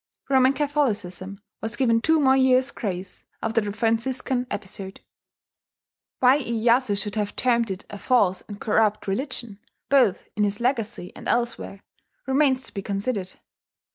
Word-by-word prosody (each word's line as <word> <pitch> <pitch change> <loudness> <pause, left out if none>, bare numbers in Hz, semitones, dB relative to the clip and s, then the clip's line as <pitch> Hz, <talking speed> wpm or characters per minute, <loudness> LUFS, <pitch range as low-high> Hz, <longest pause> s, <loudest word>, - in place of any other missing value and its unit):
Roman 260 0 +5
Catholicism 210 -10 -1 0.2
was 220 +1 -2
given 230 -3 +2
two 320 +4 +3
more 265 -2 +5
years' 260 0 +4
grace 185 -3 -5 0.2
after 225 +1 +1
the 205 -1 -3
Franciscan 245 +4 -1
episode. 195 -1 -7 1.2
Why 260 +3 +6
Iyeyasu 235 -3 +1
should 205 0 -4
have 205 -1 -2
termed 235 -3 +2
it 190 0 -5
a 205 - -9
"false 200 -8 +2
and 205 -1 -8
corrupt 215 -1 +1
religion," 235 -1 -3 0.3
both 265 -9 +3
in 210 - +1
his 205 0 0
Legacy 235 -7 -1
and - - -9
elsewhere, 235 -4 -1 0.4
remains 265 -1 +2
to - - -12
be 200 - -4
considered. 200 -1 -3
230 Hz, 140 wpm, -24 LUFS, 200-260 Hz, 1.2 s, Why